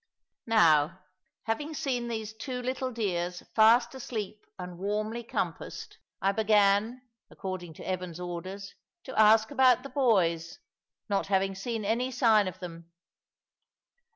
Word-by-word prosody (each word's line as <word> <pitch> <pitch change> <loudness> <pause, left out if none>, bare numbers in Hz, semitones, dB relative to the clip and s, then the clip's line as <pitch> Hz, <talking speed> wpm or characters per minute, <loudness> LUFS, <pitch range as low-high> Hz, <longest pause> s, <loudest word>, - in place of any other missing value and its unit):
Now, 170 -5 +4 0.4
having 290 +8 -3
seen 260 -6 -2
these 220 -2 -4
two 250 +3 -5
little 255 +1 -2
dears 180 -6 -2
fast 230 +4 +5
asleep 215 -5 -6
and 180 -1 -8
warmly 215 +4 -2
compassed, - - -5 0.2
I 195 - +4
began, 215 +3 +2 0.3
according 185 -4 -6
to - - -10
Evan's 180 -2 -4
orders, 185 +3 -6 0.3
to 260 - -8
ask 220 +2 +5
about 255 -3 +4
the 275 - -7
boys, 175 - +1 0.5
not 200 -1 0
having 195 0 +1
seen 215 +2 -4
any 235 +5 0
sign 225 -5 +3
of 185 - -6
them. 170 -2 -9
215 Hz, 125 wpm, -29 LUFS, 185-235 Hz, 0.5 s, fast